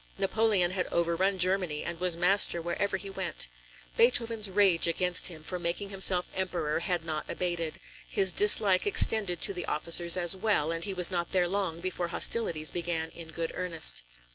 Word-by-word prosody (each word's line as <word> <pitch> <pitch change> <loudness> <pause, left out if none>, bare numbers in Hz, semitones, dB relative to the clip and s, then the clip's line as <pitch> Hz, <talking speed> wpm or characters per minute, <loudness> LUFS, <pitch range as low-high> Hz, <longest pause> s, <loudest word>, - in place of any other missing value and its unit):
Napoleon 195 -2 0
had 185 -1 -3
overrun 170 +3 -1
Germany, 180 -4 0
and 170 -1 -6
was 180 -2 0
master 180 0 +2
wherever 175 +4 -3
he 200 - -10
went. 190 - -3 0.5
Beethoven's 230 -3 +1
rage 190 -4 +3
against 180 +1 -1
him 160 -4 -6
for 180 +2 -5
making 175 +4 -4
himself 190 -2 +2
Emperor 175 -5 -3
had 170 -1 -3
not 155 -1 -5
abated; 175 -3 -4 0.3
his 185 - +2
dislike 205 -2 +6
extended 205 -3 +3
to 200 - 0
the 175 -2 -7
officers 170 +3 +1
as 175 0 +3
well, 185 -6 -1
and 165 0 -4
he 200 - -4
was 180 0 +3
not 175 -2 -3
there 180 -2 +1
long 185 -3 -3
before 180 -1 -4
hostilities 170 -4 0
began 165 -2 -4
in 170 -1 -11
good 165 +1 -5
earnest. 165 - 0
180 Hz, 170 wpm, -28 LUFS, 170-195 Hz, 0.5 s, dislike